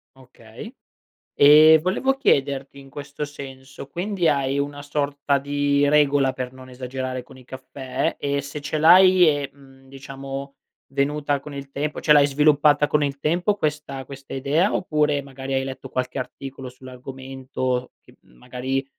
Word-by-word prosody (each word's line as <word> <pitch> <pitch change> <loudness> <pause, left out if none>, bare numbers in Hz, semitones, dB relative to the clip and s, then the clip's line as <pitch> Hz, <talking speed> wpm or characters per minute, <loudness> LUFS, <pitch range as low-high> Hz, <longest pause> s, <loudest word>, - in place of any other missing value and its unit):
Okay, 125 - -13 0.6
ehm, 155 +2 +8
volevo 250 +10 0
chiederti 140 - 0
in 135 0 -14
questo 140 +1 -7
senso, 135 -2 -9
quindi 180 +3 -2
hai 140 -2 +1
una 145 0 -4
sorta 145 -1 -1
di 145 +1 +1
regola 140 -2 +3
per 125 -1 -5
non 130 0 -13
esagerare 130 0 -5
con 130 +1 -16
i 130 - -16
caffè? 130 0 -4
E 140 0 -1
se 140 +2 -7
ce 145 +2 -3
l'hai 185 +3 +7
è, 145 -2 0
mhmm, 135 -1 -19
diciamo 135 0 -8 0.4
venuta 145 +1 0
con 145 +1 -10
il 140 -1 -8
tempo, 145 +2 -3
cioè 150 - +5
l'hai 145 -1 +6
sviluppata 150 +1 +3
con 150 0 +1
il 140 -1 -3
tempo 175 +8 +1
questa 150 -6 -3
questa 135 0 -10
idea 145 +9 +1
oppure, 150 -4 0
magari, 135 -1 -7
hai 135 0 +1
letto 135 0 -7
qualche 125 +1 -3
articolo 135 +1 -7
sull'argomento 130 0 -5
che - - -21
m - - -26
magari, 130 - -4
140 Hz, 155 wpm, -23 LUFS, 135-150 Hz, 0.6 s, ehm